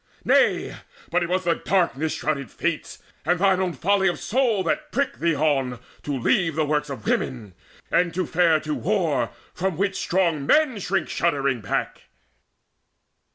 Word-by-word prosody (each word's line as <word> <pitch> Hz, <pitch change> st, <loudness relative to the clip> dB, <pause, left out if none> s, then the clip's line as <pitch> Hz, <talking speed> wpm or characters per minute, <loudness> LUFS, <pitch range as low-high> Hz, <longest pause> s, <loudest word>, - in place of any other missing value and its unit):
Nay, -, -, +3 dB, 0.4 s
but 180 Hz, +2 st, +2 dB
it 170 Hz, -, -2 dB
was 185 Hz, +1 st, 0 dB
the 170 Hz, -1 st, +2 dB
darkness 160 Hz, -4 st, 0 dB
shrouded 140 Hz, -3 st, -2 dB
Fates 170 Hz, -2 st, -3 dB, 0.2 s
And 175 Hz, +3 st, +2 dB
thine 190 Hz, 0 st, +3 dB
own 180 Hz, -2 st, -1 dB
folly 195 Hz, +2 st, +2 dB
of 175 Hz, -, 0 dB
soul 230 Hz, -5 st, +1 dB
that 300 Hz, +4 st, -2 dB
pricked 280 Hz, -1 st, -1 dB
thee 165 Hz, -2 st, +1 dB
on 135 Hz, -4 st, +1 dB, 0.2 s
To 145 Hz, -2 st, -3 dB
leave 165 Hz, +6 st, +1 dB
the 155 Hz, -1 st, +1 dB
works 150 Hz, 0 st, 0 dB
of 130 Hz, -6 st, -7 dB
women, 115 Hz, -7 st, -2 dB, 0.4 s
and 175 Hz, -1 st, +2 dB
to 185 Hz, -1 st, 0 dB
fare 165 Hz, -1 st, +3 dB
To 155 Hz, 0 st, -3 dB
war, 160 Hz, -, 0 dB, 0.2 s
from 185 Hz, -2 st, -2 dB
which 195 Hz, +1 st, 0 dB
strong 170 Hz, -5 st, +1 dB
men 300 Hz, -8 st, +3 dB
shrink 190 Hz, -3 st, -1 dB
shuddering 140 Hz, -7 st, 0 dB
back." 100 Hz, -, -3 dB
170 Hz, 160 wpm, -24 LUFS, 150-190 Hz, 0.4 s, Nay